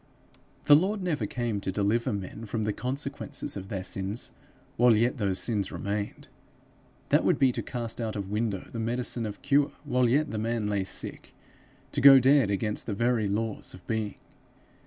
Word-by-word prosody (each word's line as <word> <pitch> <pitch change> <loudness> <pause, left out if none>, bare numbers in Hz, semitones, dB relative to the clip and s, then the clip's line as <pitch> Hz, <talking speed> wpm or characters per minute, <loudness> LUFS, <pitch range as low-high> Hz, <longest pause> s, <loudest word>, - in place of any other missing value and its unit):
The 145 - +8
Lord 190 +5 +1
never 165 -5 -1
came 115 -5 -2
to 95 - -2
deliver 105 +4 +1
men 105 +2 -5
from 110 +1 -2
the 105 0 0
consequences 140 +3 -4
of 95 -1 -6
their 95 -2 -4
sins 95 +4 -2 0.4
while 120 -1 +5
yet 120 +5 +1
those 100 -3 0
sins 105 -4 0
remained: 100 +1 -4 0.8
that - - +4
would - - +3
be 130 -2 +4
to - - -3
cast 120 -2 -4
out 110 -2 -3
of 100 -1 -4
window 105 -3 -2
the 115 - -5
medicine 120 0 -1
of 105 - -8
cure 140 0 +3
while 125 -1 +2
yet 145 +4 +2
the 110 - -3
man 115 0 -1
lay 100 -2 0
sick; - - -6 0.6
to - - -1
go 135 0 +10
dead 135 -3 +4
against 105 +1 -1
the 105 - -2
very 115 -1 +1
laws 105 +1 -2
of 90 - -16
being. 110 -2 -2
115 Hz, 180 wpm, -28 LUFS, 100-125 Hz, 0.8 s, go